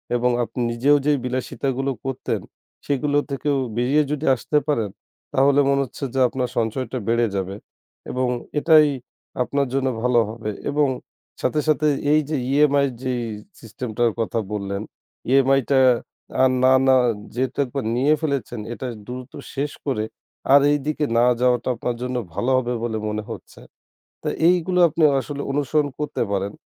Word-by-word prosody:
এবং 125 +1 +2
আপনি 125 - -6
নিজেও 135 +5 +3
যেই 150 -1 +3
বিলাসিতাগুলো 130 +1 -2
করতেন 135 -1 -2 0.4
সেগুলো 145 +1 0
থেকেও 140 +1 0 0.2
বেরিয়ে 135 +5 +3
যদি 150 +1 -2
আসতে 150 +5 -1
পারেন, 115 -9 0 0.4
তাহলে 140 +1 +4
মনে 140 0 +3
হচ্ছে 130 - -10
যে 135 - 0
আপনার 125 0 -2
সঞ্চয়টা 120 +2 -1
বেড়ে 115 0 +2
যাবে 95 0 -2 0.6
এবং 130 0 0 0.3
এটাই 155 -1 +6 0.6
আপনার 140 +1 -1
জন্য 135 -1 +1 0.2
ভালো 125 -1 +4
হবে 110 -1 -5 0.2
এবং 145 0 +2 0.5
সাথে, 150 +4 +1
সাথে 155 0 +3 0.3
এই 155 - +5
যে 155 - 0 0.2
EMI 140 0 +4 0.2
যেই 125 -2 -1 0.4
সিস্টেমটার 115 0 -2
কথা 115 0 -1
বললেন, 100 -1 -3 0.5
EMI 135 0 +5
টা 135 - +4 0.6
আর 130 - +6
না, 130 0 +6
না 130 - +6 0.4
যেহেতু 130 +1 -2
একবার 135 0 -4
নিয়ে 140 +5 +3
ফেলেছেন 140 -6 -2
এটা 130 - -5 0.2
দ্রুত 125 0 -7 0.2
শেষ 145 +1 -1
করে 130 -6 0 0.5
আর 140 - +8
এইদিকে 150 +1 0
না 120 - +5 0.2
যাওয়াটা 125 0 +2
আপনার 120 0 -3
জন্য 125 0 -3 0.2
ভালো 110 +7 0
হবে 125 -1 -1
বলে 110 -2 -1
মনে 105 0 -3
হচ্ছে। - - -10 0.6
তো - - -2 0.2
এইগুলো 180 0 +2
আপনি 160 +1 -2 0.2
আসলে 145 +1 -5
অনুসরণ 145 +1 +1
করতে 150 -4 -2
পারেন। 100 +1 -1
130 Hz, 150 wpm, -22 LUFS, 120-145 Hz, 0.6 s, আর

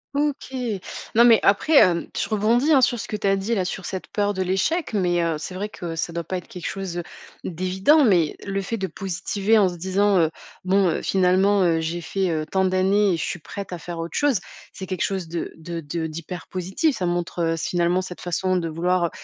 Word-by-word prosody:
OK. 285 -2 -1 0.6
Non, 235 - +7
mais 230 -2 +7
après, 205 +11 +3
hem, 170 -2 +5
je - - -1
rebondis 230 +8 +2
hein, 270 -3 +6
sur 245 -1 +3
ce - - -5
que 210 - -2
tu 205 -1 -1
as 195 - +4
dit, 195 +4 -2
là, 185 -2 0
sur 185 0 -5
cette 190 -1 -5
peur 205 -1 0
de 190 - -3
l'échec, 195 - 0
mais 175 -3 +1
heu, 165 -1 0
c'est 160 +4 -6
vrai 200 +3 -3
que 170 -5 -6
ça 165 +1 -3
doit 170 0 -3
pas 185 - -3
être 180 - -9
quelque 180 -2 -7
chose 185 -3 -4 0.4
d'évident, 190 - +2
mais 175 -8 +3
le 195 0 -2
fait 210 +4 -3
de 190 -1 -2
positiver 195 +4 0
en 200 - +5
se 175 - -7
disant, 190 +3 +2
heu: 160 - +3 0.4
«Bon, 190 0 +3
heu, - - -1
finalement 190 +2 +3
heu, 165 -2 +2
j'ai 165 +2 -2
fait, 190 +2 -1
heu, 155 -2 -1
tant 190 0 +1
d'années 190 +1 +3
et - - 0
je - - -3
suis 175 - -4
prête 195 +4 -7
à 180 - -3
faire 170 +1 -7
autre 165 0 -5
chose», 285 -9 +2 0.3
c'est 190 - -7
quelque 185 -2 -2
chose 190 -4 -2
de 170 +1 -4
de 165 +1 -6
de 160 +2 -3
d'hyper 165 +3 -7
positif. 190 - -1
Ça 185 - -1
montre, 175 0 -1
heu, 165 - +1
s 165 0 -4
finalement 175 +1 +1
cette 185 -1 -8
façon 185 +1 0
de 165 -2 -2
vouloir, 175 +2 +1
heu, 170 - -1
185 Hz, 235 wpm, -23 LUFS, 170-200 Hz, 0.6 s, Non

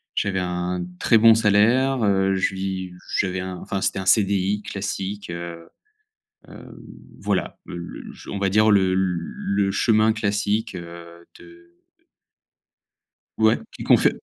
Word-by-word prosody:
j'avais 95 -2 0
un 90 0 -2 0.2
très 115 - +5
bon 115 0 +7
salaire, 115 +5 +3
heu, 95 -1 +2
je 95 0 0
vi 95 -1 -4 0.3
j'avais 95 -1 -1
un 90 0 -5
enfin, 95 +2 -4
c'était 95 0 0
un 95 - -5
CDI 100 0 +2
classique, 100 0 -5
heu, 85 -1 -7 0.8
hem, - - -12 0.5
voilà - - -2
le 90 - -7 0.2
l - - -10
ch - - -14
on 100 - -4
va 100 0 +1
dire 110 +3 +4
le 95 -2 +3
le 95 +2 -1
chemin 110 +2 +3
classique, 105 +1 -1
heu, 85 -1 -10
de 85 0 -18 1.6
Ouais, 110 0 +4 0.2
qui - - -8
confe - - +5
95 Hz, 140 wpm, -23 LUFS, 90-105 Hz, 1.6 s, bon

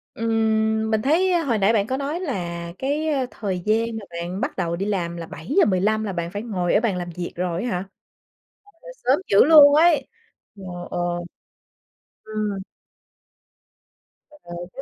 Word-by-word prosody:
Ừm, 220 -1 +1
mình 220 - +2
thấy, 340 +9 +2
a, 345 -2 +2
hồi 240 -7 +1
nãy 205 +3 +3
bạn 205 -2 +1
có 260 - -1
nói 285 +5 -3
là 170 - -4
cái, 290 +4 -1
a, 280 -4 +1
thời 190 -4 -3
gian 225 +2 +2
mà 200 - -11
bạn 180 +4 -4
bắt - - -2
đầu 170 -2 -1
đi 195 +3 -3
làm 175 -4 -2
là 170 - -6
7:15 210 - +1
là 200 -3 -3
bạn 170 0 -3
phải 205 +1 -4
ngồi 185 -7 -1
ở 210 - +4
bàn 215 -6 0
làm 175 -1 -4
việc 175 -1 -4
rồi 180 +1 -2
á 245 - -2
hả? 185 -1 -3 0.9
Trời 330 - -36
ơi, - - -10
sớm 260 +4 +4
dữ 200 - +6
luôn 290 -1 +8
ấy! 325 0 +4 0.5
Ờ, 195 - -12 0.3
ờ. 180 - -3 1.3
Ừm. 215 -2 -3 1.7
Ờ, 300 - -17 0.4
chứ 270 - -7
215 Hz, 180 wpm, -23 LUFS, 180-270 Hz, 1.7 s, luôn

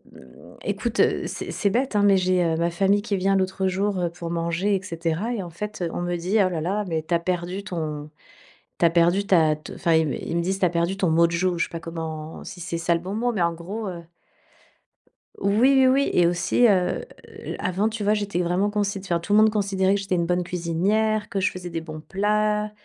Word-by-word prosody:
hem 65 -1 -16
écoute, - - -2 0.3
c'est - - -5
c'est 200 - 0
bête 250 +1 0
hein, 205 - +3
mais 200 -1 +5
j'ai 185 -1 +2
ma 170 +1 +1
famille 195 +4 +2
qui 205 -1 -2
vient 195 +1 +2
l'autre 190 0 0
jour, 195 +1 0
heu, 175 -1 0
pour 170 -1 -7
manger 170 +4 0
et 190 - -2
cetera. 170 +5 -2
Et 225 - -3
en 175 - -7
fait, 210 +3 -6
on - - -3
me 175 0 -1
dit: 180 +5 0
«Oh - - +1
là, 170 -3 -3
là, 200 +6 -1
mais 160 -2 -2
tu 165 - -3
as 170 - +3
perdu 180 +2 -3
ton 155 -5 -4 0.7
tu 170 - +4
as - - +4
perdu 175 +4 +3
ta 160 -5 +4
te», 155 - -11
enfin, 170 - 0
ils 160 -2 +3 0.2
ils 170 - -2
me 170 - +1
disent: 190 +3 -1
«Tu - - +3
as 180 - +3
perdu 170 +3 0
ton 190 -4 +1
mojo». 170 +2 +2
Je - - +2
sais - - -11
pas 165 - -6
comment 160 -1 -6
si 180 - -9
c'est 170 0 -4
ça 170 +1 +1
le 170 - -1
bon 185 +3 -5
mot, 240 +3 0
mais 205 -6 0
en 170 0 +2
gros, 190 +7 -6
heu 175 -2 -6 1.4
Oui, 260 +7 +4
oui, 270 +2 +3
et 175 -1 +4
aussi, 175 +7 +3
heu, 185 -4 +1 0.5
avant, 190 +4 0
tu 220 -1 -5
vois, 205 +1 +3
j'étais 205 -4 -1
vraiment, 180 +4 +1
consi 205 -1 -1
enfin 180 -3 -1
tout 185 +5 -2
le - - +6
monde 220 0 +6
considérait 195 -2 +1
que - - -1
j'étais 195 -1 -3
une 170 -2 +1
bonne 180 0 +1
cuisinière, 195 +6 0
que 195 - -2
je 185 - +1
faisais 180 -1 -7
des 165 0 -3
bons 155 -1 -8
plats, 210 +4 0
180 Hz, 235 wpm, -24 LUFS, 170-205 Hz, 1.4 s, le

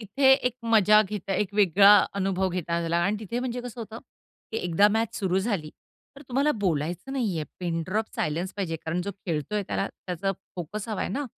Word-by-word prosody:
तिथे 265 +6 +4
एक 250 -3 +2
मजा 215 -2 +5
घेता 195 -1 -4
एक 205 -1 0
वेगळा 200 +1 +7 0.2
अनुभव 190 -1 0
घेता 175 -2 -3
आला 170 0 0
आणि 205 +2 +1
तिथे 220 +3 -4
म्हणजे 250 -1 -3
कसं 245 -1 -8
होतं, 225 +1 -7 0.5
की - - -2
एकदा 180 +3 +3
मॅच 225 +1 0
सुरू 190 -2 +1
झाली, 190 -7 -2 0.5
तर 280 - -11
तुम्हाला 275 +4 +2
बोलायचं 175 - -1
नाही 225 -10 -1
आहे. 155 - -2 0.2
पिन 165 -2 -1
ड्रॉप 215 +4 0
सायलेन्स 165 +5 -2
पाहिजे. 175 -5 -2
कारण 160 +2 -3
जो 200 - -3 0.2
खेळतोय 175 +5 -1
त्याला 195 - -1
त्याचा 185 +2 -4 0.2
फोकस 200 +6 -5
हवाय 215 -3 -2
ना. 280 +9 -2
195 Hz, 190 wpm, -26 LUFS, 175-225 Hz, 0.5 s, वेगळा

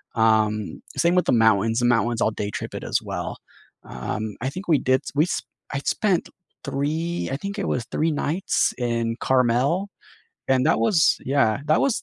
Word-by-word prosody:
um, 110 -2 +1 0.2
same 170 +1 +3
with 180 - +3
the - - +2
mountains, 110 -1 +3
the 120 - +1
mountains 120 -1 +2
I'll - - +3
day 105 -1 -4
trip - - -5
it - - -5
as - - 0
well. - - -5 0.5
Um, 105 - -5
I 130 - -1
think 185 +8 -8
we 160 -3 +4
did 130 +1 +2
s - - -7
we 150 - +4
s 180 - -2 0.3
I 135 - -1
spent 190 +5 0 0.3
3 160 +5 -2
I 135 - -1
think 200 +6 -6
it 195 - -2
was 120 - -1
3 160 +2 +1
nights 155 +5 0
in 115 -1 -1
Carmel 130 +9 +2 0.6
and 130 -1 +3
that - - +3
was 160 - +4
Yeah, 130 -5 +2
that 155 +1 +3
was 270 -4 +1
130 Hz, 190 wpm, -23 LUFS, 115-160 Hz, 0.6 s, we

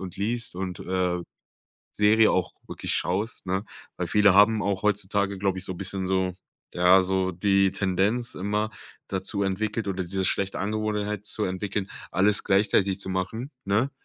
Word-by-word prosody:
und 95 -2 -7
liest 115 +3 -2
und, 90 -2 -4
äh, 90 -1 -1 0.7
Serie 110 +1 +4
auch 90 -2 0
wirklich - - -4
schaust, 100 +4 -1
ne? 95 +3 -1 0.3
Weil - - -2
viele 105 -2 +4
haben 105 +1 +5
auch 100 -2 -1
heutzutage, 100 -1 0
glaube 95 -1 0
ich, - - -5
so 95 - -4
bisschen 95 +1 -4
so 95 -1 +1 0.4
ja, 90 +2 +6
so 95 0 0
die 95 +1 +3
Tendenz 100 +6 0
immer 105 +3 -1 0.4
dazu 95 +1 -1
entwickelt 105 +3 -1
oder 95 -1 -2
diese 95 +2 -2
schlechte 100 0 -1
Angewohnheit 105 0 -2
zu 105 - -1
entwickeln, 95 +1 -3 0.2
alles 100 +3 +3
gleichzeitig 95 -1 +3
zu 95 - -4
machen, 95 +8 -3
ne? 110 +8 +1
100 Hz, 160 wpm, -26 LUFS, 95-105 Hz, 0.7 s, ja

